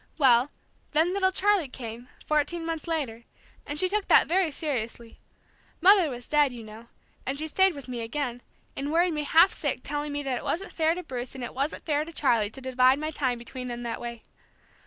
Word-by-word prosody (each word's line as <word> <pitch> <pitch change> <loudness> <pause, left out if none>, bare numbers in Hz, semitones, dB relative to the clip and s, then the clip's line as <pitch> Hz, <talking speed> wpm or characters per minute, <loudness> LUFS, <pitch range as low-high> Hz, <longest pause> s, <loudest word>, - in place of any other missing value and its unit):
Well, 260 -2 +5 0.4
then 320 +4 +3
little 380 -1 +2
Charlie 390 -4 +2
came, 240 -1 -8 0.2
fourteen 305 +3 0
months 330 0 -4
later, 260 -9 -3 0.4
and 290 - -4
she 370 - +3
took 410 +1 -1
that - - +6
very 360 0 +2
seriously. 235 -6 -4 0.6
Mother 370 -2 +6
was 245 -2 -7
dead, 295 -3 +3
you 240 -2 -9
know, 220 +2 -12 0.4
and 270 +1 -2
she 310 - -3
stayed 380 +3 +3
with 280 -2 -9
me 245 -2 -4
again, 245 +1 -3 0.3
and 285 +2 -3
worried 340 +1 +3
me 300 -1 -2
half 335 +6 +5
sick 285 -5 -2
telling 290 +1 -3
me 290 0 -3
that 260 -3 -1
it - - -10
wasn't 390 +5 -3
fair 320 0 +2
to 360 - -5
Bruce 255 -3 -6
and 260 - -6
it 240 - -5
wasn't 275 +4 -3
fair 300 -2 +1
to 330 - -9
Charlie 230 -8 +2
to 265 +5 -8
divide 255 0 +3
my 310 +1 -3
time 260 -5 -1
between 250 +2 -7
them 240 0 -5
that 235 - -4
way. 235 -1 -7
285 Hz, 210 wpm, -27 LUFS, 245-325 Hz, 0.6 s, that